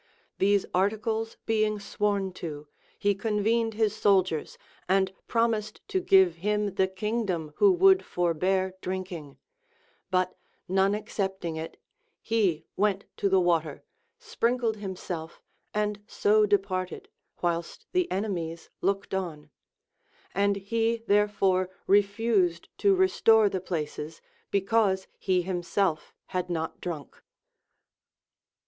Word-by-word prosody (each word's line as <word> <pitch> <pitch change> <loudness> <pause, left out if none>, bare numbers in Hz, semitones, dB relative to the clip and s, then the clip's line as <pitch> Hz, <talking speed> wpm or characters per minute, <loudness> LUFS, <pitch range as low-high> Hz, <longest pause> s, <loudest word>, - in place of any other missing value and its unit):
These 200 0 +3
articles 220 +4 0
being 215 -1 +1
sworn 200 -1 -1
to, 150 -3 -6 0.3
he 205 0 +2
convened 220 +2 0
his 215 -1 +1
soldiers, 190 -7 +1 0.3
and 190 0 +2
promised 225 -2 0
to 385 -2 +1
give 190 - +5
him 210 +2 0
the 190 -1 +2
kingdom 190 -5 -2
who 405 -1 +6
would 380 +1 +5
forbear 185 +2 0
drinking; 180 -6 -5 0.7
but 185 -1 +1 0.3
none 190 +2 +2
accepting 190 -5 -3
it, 160 +1 -6 0.4
he 190 -9 0
went 200 -1 +1
to 200 - +1
the 190 0 +4
water, 165 -4 0 0.3
sprinkled 240 - 0
himself, 180 -5 -6 0.3
and 210 -1 -1
so 210 0 +3
departed, 190 -2 -1 0.4
whilst 170 -1 -2
the 365 -1 +1
enemies 175 -4 -3
looked 195 +1 -1
on; 155 -6 -4 0.8
and 200 +1 +2
he 225 +3 -1
therefore 195 -3 +2 0.2
refused 200 -3 +2
to 400 -1 +4
restore 225 - +4
the 190 -2 -3
places, 155 -3 -4 0.3
because 195 -1 +2
he 185 -2 +1
himself 175 -2 -1 0.2
had 180 -1 -2
not 160 -2 -3
drunk. 160 -6 -6
195 Hz, 110 wpm, -28 LUFS, 180-215 Hz, 0.8 s, who